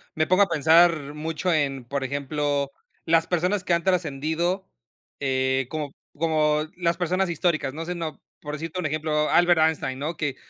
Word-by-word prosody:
me 155 0 +1
pongo 185 +3 +5
a - - +1
pensar, 160 -1 +4
mucho 160 +3 -2
en 135 -4 0
Por 140 +2 -3
ejemplo, 140 +1 -1 0.3
las 165 0 +3
personas 180 +3 0
que 180 - +1
han 170 - +1
trascendido, 175 +2 -1 0.5
eh, 130 -1 0
como 150 -3 -4
p - - -34 0.2
como 155 -1 +2
las 170 -1 0
personas 185 +1 0
históricas. 155 -4 0
No 165 +2 -5
sé, 180 +1 -3
no 165 -2 -4
p - - -30 0.2
por 150 0 -6
decirte 165 +4 -5
un 180 - -3
ejemplo, 150 0 0
Albert 175 -1 +4
Einstein, 155 -5 +1
¿no? 155 +4 -3
Que 145 -4 -2
155 Hz, 185 wpm, -25 LUFS, 145-170 Hz, 0.5 s, pongo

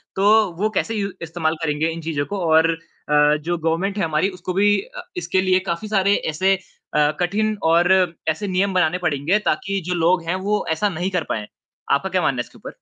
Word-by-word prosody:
तो 205 0 +4
वो 215 - +2
कैसे 225 +3 0
यू 200 -1 -2
इस्तेमाल 165 -1 -1
करेंगे 150 +1 0
इन 165 0 -5
चीज़ों 155 -3 -2
को? 200 +3 -4
और 160 +1 +4 0.4
अ, 150 0 +4
जो 170 +3 -3
गवर्नमेंट 165 +5 -1
है 195 - 0
हमारी 160 +4 +1
उसको 180 -1 -6
भी 205 +2 +3
अ, - - -10 0.2
इसके 190 - 0
लिए 185 0 +3
काफ़ी 170 +5 -3
सारे 200 -1 +2
ऐसे 190 +6 +2
अ, 150 -5 -2
कठिन 210 +4 0
और 170 +3 +4 0.4
ऐसे 200 +6 -2
नियम 190 +1 0
बनाने 180 -1 +2
पड़ेंगे 170 +2 +1
ताकि 195 -1 -1
जो 180 - 0
लोग 175 +1 +2
हैं 185 - +1
वो 210 0 0
ऐसा 205 +6 +1
नहीं 180 +1 -3
कर 180 -4 0
पाएँ। 105 -1 -2 0.5
आपका - - +1
क्या - - +1
मानना - - 0
है - - -7
इसके - - -18
ऊपर? - - -9
180 Hz, 210 wpm, -21 LUFS, 160-200 Hz, 0.5 s, तो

